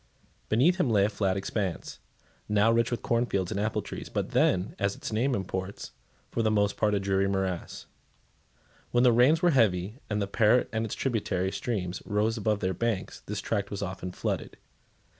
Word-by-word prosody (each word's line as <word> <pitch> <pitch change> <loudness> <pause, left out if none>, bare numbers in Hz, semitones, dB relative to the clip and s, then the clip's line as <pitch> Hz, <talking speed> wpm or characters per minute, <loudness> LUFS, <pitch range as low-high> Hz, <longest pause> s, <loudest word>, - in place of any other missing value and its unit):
Beneath 145 +12 +4
him 180 -9 +1
lay 100 -3 +4
a - - +1
flat 100 -3 0
expanse, 100 -2 -3 0.5
now 105 +2 +4
rich 115 0 +2
with 120 - -3
cornfields 115 -6 0
and 100 - -2
apple 110 +1 -1
trees, - - -7
but - - -3
then, 90 +2 +2
as 100 0 0
its - - -6
name 125 +4 +1
imports, 95 0 -4 0.4
for 115 - 0
the 110 - +2
most 105 -1 +2
part 105 -1 +1
a - - +1
dreary 95 0 +1
morass. 95 -2 -3 1.0
When 120 0 +3
the 125 - +6
rains 140 +9 +4
were 175 - +5
heavy, 105 - +2
and 105 -1 0
the 100 - 0
Parret 110 +4 +3
and 110 0 0
its - - -4
tributary 100 -7 -1
streams 100 -3 -3
rose 105 +2 0
above 105 -2 0
their 95 0 0
banks, 115 0 -2
this - - -3
tract 100 -3 -2
was 100 -1 -4
often 95 -1 -5
flooded. - - -3
105 Hz, 185 wpm, -28 LUFS, 95-115 Hz, 1.0 s, the